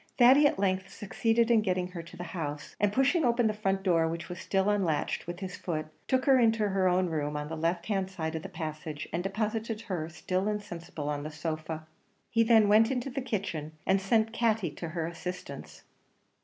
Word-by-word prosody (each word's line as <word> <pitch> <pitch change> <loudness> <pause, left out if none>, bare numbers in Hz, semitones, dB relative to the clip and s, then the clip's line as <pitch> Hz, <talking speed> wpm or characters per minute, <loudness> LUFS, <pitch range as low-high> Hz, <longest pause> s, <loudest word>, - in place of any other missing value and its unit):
Thady 270 +4 +7
at - - -1
length 190 -1 0
succeeded 225 +3 +1
in 225 -2 +5
getting 185 -3 0
her 180 -2 -6
to 165 - -13
the 175 - -5
house; 150 -4 -5
and 205 0 +3
pushing 270 - +3
open 240 -1 +3
the 215 - +2
front 195 -2 -1
door, 165 -4 +3
which 170 +3 -4
was 180 - -6
still 195 0 0
unlatched, 190 -9 0
with 175 +2 -6
his 185 -1 -5
foot, 155 -3 -3 0.2
took 260 -1 +2
her 270 -2 +6
into 225 -3 +3
her 190 -1 +2
own 180 +1 +3
room 150 -3 -2
on 150 0 -4
the 160 - -4
left 170 +2 -1
hand 195 -3 -1
side 160 -4 -4
of 160 - -3
the 195 - -7
passage, 155 -3 -5
and 170 - 0
deposited 215 +3 -2
her 180 -8 -3
still 185 +4 -2
insensible 170 -7 -4
on 145 -1 -1
the 150 - -5
sofa. 155 0 -4 0.5
He 230 - +3
then 225 -2 +6
went 220 +2 +6
into 260 0 -2
the 270 +2 -3
kitchen, 190 - -3
and 190 0 +3
sent 220 +3 +2
Katty 220 -8 +1
to 165 +3 -6
her 165 0 -2
assistance. 180 +2 -7
190 Hz, 210 wpm, -29 LUFS, 165-220 Hz, 0.5 s, Thady